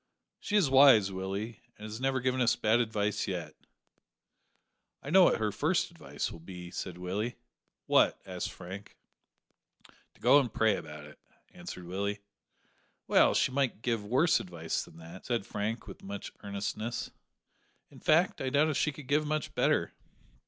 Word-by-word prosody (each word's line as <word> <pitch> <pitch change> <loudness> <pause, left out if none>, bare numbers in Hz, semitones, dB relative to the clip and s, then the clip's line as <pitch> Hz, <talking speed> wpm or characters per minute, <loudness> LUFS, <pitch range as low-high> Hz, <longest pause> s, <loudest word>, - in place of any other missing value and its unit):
"She 210 - -3
is 200 -7 +5
wise, 130 -7 +7
Willie, 100 +4 -4 0.2
and 105 - -12
has 110 +3 -7
never 135 0 +1
given 130 0 0
us 120 -1 +3
bad 110 +2 +2
advice 105 -3 -1
yet." 90 -4 -4 1.5
"I 140 - -6
know 185 0 +8
what - - +3
her 110 -1 0
first - - 0
advice - - -5
will - - -10
be," 90 +1 -9
said 90 0 -5
Willie. 100 +7 -3 0.5
"What?" - - +4
asked - - -4
Frank. 95 +3 -10 1.2
"To - - -24
go 145 - +6
and 125 -5 -1
pray 110 -1 +3
about 75 -1 -8
it," 75 - -15 0.3
answered 90 - -8
Willie. 100 +3 -3 0.8
"Well, - - +4
she - - +2
might 130 -4 -1
give 115 -4 0
worse 130 +11 +3
advice 80 -3 -3
than 80 - -15
that," 85 +3 -11
said 120 -5 -1
Frank, 110 +1 -3
with 95 - -11
much 100 0 -7
earnestness. 100 +3 -4 0.8
"In - - -14
fact, 165 +4 +3
I 130 - -1
doubt 145 +3 +3
if 150 - -1
she 150 - +1
could 150 -1 -11
give 150 +3 +1 0.2
better." - - +1
110 Hz, 160 wpm, -30 LUFS, 95-130 Hz, 1.5 s, know